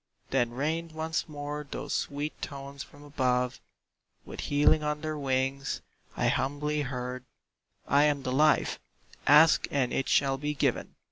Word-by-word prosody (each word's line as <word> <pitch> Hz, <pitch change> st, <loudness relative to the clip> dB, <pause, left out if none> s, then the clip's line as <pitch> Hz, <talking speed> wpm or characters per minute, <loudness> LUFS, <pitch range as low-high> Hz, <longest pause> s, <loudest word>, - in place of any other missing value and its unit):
Then 120 Hz, -3 st, +2 dB
rained 155 Hz, +6 st, -2 dB
once 160 Hz, +1 st, -2 dB
more 145 Hz, 0 st, -5 dB
those 145 Hz, -, -4 dB
sweet 145 Hz, +2 st, -3 dB
tones 140 Hz, -1 st, -7 dB
from 145 Hz, +1 st, -12 dB
above 125 Hz, -3 st, 0 dB, 0.6 s
With -, -, -9 dB
healing 145 Hz, +1 st, +3 dB
on 150 Hz, 0 st, -2 dB
their 155 Hz, -1 st, -3 dB
wings: 135 Hz, -1 st, -1 dB, 0.4 s
I -, -, +2 dB
humbly 150 Hz, +2 st, 0 dB
heard, 125 Hz, -2 st, -4 dB, 0.6 s
"I 140 Hz, +2 st, +5 dB
am 145 Hz, -2 st, +1 dB
the 130 Hz, -, -2 dB
Life, 150 Hz, +4 st, +3 dB, 0.5 s
ask 150 Hz, +3 st, +7 dB
and 135 Hz, -3 st, 0 dB
it 135 Hz, -, -1 dB
shall 135 Hz, -1 st, +3 dB
be 150 Hz, +1 st, -2 dB
given! -, -, -1 dB
145 Hz, 145 wpm, -29 LUFS, 135-150 Hz, 0.6 s, ask